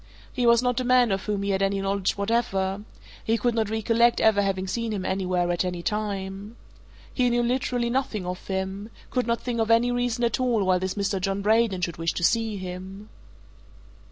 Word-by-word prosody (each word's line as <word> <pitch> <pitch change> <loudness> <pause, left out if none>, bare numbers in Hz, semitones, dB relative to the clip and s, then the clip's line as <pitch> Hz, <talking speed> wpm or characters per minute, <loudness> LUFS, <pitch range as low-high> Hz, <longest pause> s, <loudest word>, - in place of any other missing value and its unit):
He 245 -2 +1
was 235 +1 +5
not 250 0 +1
a - - -1
man 250 -2 +4
of 195 0 -2
whom 205 -2 -1
he 200 - 0
had 190 0 0
any 195 0 +1
knowledge 195 0 -1
whatever 200 -2 0 0.4
he 225 +1 +1
could 240 +2 0
not 220 -2 0
recollect 230 +2 +2
ever 220 -2 +4
having 195 -1 -1
seen 230 +3 -2
him 195 -3 -3
anywhere 180 -2 0
at 175 - 0
any 180 -1 -4
time. 205 0 -3 0.6
He 250 -2 +2
knew 240 0 +1
literally 245 -1 0
nothing 235 -7 -1
of 180 +1 -6
him 190 +2 -3 0.2
could 250 -2 0
not 235 0 0
think 240 -2 -3
of 225 0 0
any 230 +2 +4
reason 245 0 -1
at 235 0 +1
all 240 -5 +1
why 185 -1 +3
this 185 0 -3
Mr. 200 -1 -1
John 195 +1 -1
Braden 215 -3 +2
should 170 -2 -2
wish 165 0 -1
to - - -4
see 225 +2 +1
him. 185 +2 -8
210 Hz, 205 wpm, -25 LUFS, 190-235 Hz, 0.6 s, was